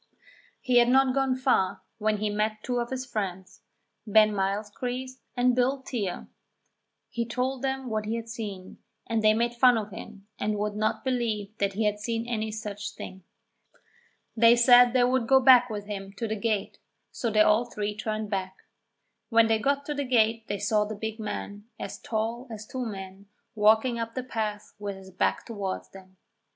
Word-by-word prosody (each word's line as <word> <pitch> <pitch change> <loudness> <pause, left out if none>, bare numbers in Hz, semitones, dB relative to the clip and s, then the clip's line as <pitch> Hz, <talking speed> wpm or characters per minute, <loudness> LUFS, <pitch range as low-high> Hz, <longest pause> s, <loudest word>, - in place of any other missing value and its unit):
He 250 -2 +3
had 240 0 +4
not 265 0 +4
gone 270 -1 +1
far 250 -8 +1 0.2
when 215 0 +1
he 210 0 -1
met 215 +1 -1
two 245 -1 -1
of 235 0 -3
his 260 0 -4
friends, 190 -6 -5 0.5
Ben 215 0 +5
Mylechreest 230 +6 -3 0.2
and 245 0 +3
Bill 260 +2 +1
Teare. 205 -9 -4 0.8
He 235 - -1
told 250 +2 -2
them 265 -1 -2
what 215 -2 -2
he 225 - -1
had 230 0 -5
seen, 205 -5 -7 0.3
and 225 -1 0
they 215 0 +5
made 235 +1 0
fun 245 0 +5
of 210 -1 -4
him 200 +1 -10
and 210 0 -1
would 210 0 -2
not 215 +1 -1
believe 225 -5 -2
that 200 -1 0
he 215 +3 -1
had 210 0 0
seen 230 +2 -2
any 220 -2 -2
such 210 -1 -6
thing. 190 -1 -9 1.1
They 230 +1 +6
said 245 0 +7
they 250 -1 +4
would 250 -1 +1
go 265 +1 +6
back 250 -1 +7
with 205 -2 -5
him 195 -1 -6
to 225 +3 -4
the 220 - -2
gate, 215 -2 -2 0.3
so 235 - -2
they 215 -1 +4
all 215 +3 +4
three 210 -3 -4
turned 215 0 -3
back. 190 -1 -2 0.7
When 230 -1 +5
they 225 -1 +2
got 280 +4 0
to 295 - -2
the 285 0 -2
gate 225 -3 +2
they 205 - -2
saw 210 +1 +1
the 215 +1 -5
big 220 +2 -5
man, 205 -1 -5
as - - -6
tall 230 +3 -3
as 215 -2 -7
two 255 +1 -4
men, 195 -1 -8 0.3
walking 220 +3 +3
up 230 0 -4
the 255 - -2
path 215 -4 -4
with 205 -1 -4
his 190 0 -13
back 185 - 0
towards 200 -5 -4
them. 190 -1 -15
220 Hz, 190 wpm, -27 LUFS, 205-245 Hz, 1.1 s, said